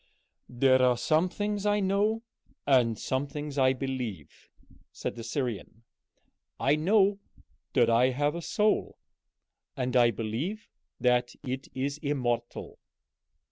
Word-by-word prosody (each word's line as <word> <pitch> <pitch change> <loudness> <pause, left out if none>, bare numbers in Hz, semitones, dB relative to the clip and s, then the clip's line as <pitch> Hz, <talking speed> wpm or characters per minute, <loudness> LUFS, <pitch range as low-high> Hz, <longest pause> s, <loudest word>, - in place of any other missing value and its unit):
"There 130 +1 +3
are 125 -1 +4
some 155 +8 +2
things 205 +1 -3
I 205 0 +2
know, 205 +3 +1 0.4
and 125 -5 +3
some 130 +2 -2
things 145 0 -5
I 130 0 +4
believe," 125 - -6 0.4
said - - -5
the 115 - -7
Syrian. 115 -3 -4 0.8
"I 140 +2 +3
know 200 +5 +3 0.5
that 120 -3 +4
I 120 +2 +4
have 145 +3 0
a 170 - -5
soul, 210 +5 0 0.8
and 125 -1 -2
I 120 -1 +6
believe 120 - -4 0.3
that 125 -1 +1
it 130 0 -4
is 140 +3 -2
immortal." 125 -6 -3
135 Hz, 125 wpm, -28 LUFS, 120-165 Hz, 0.8 s, I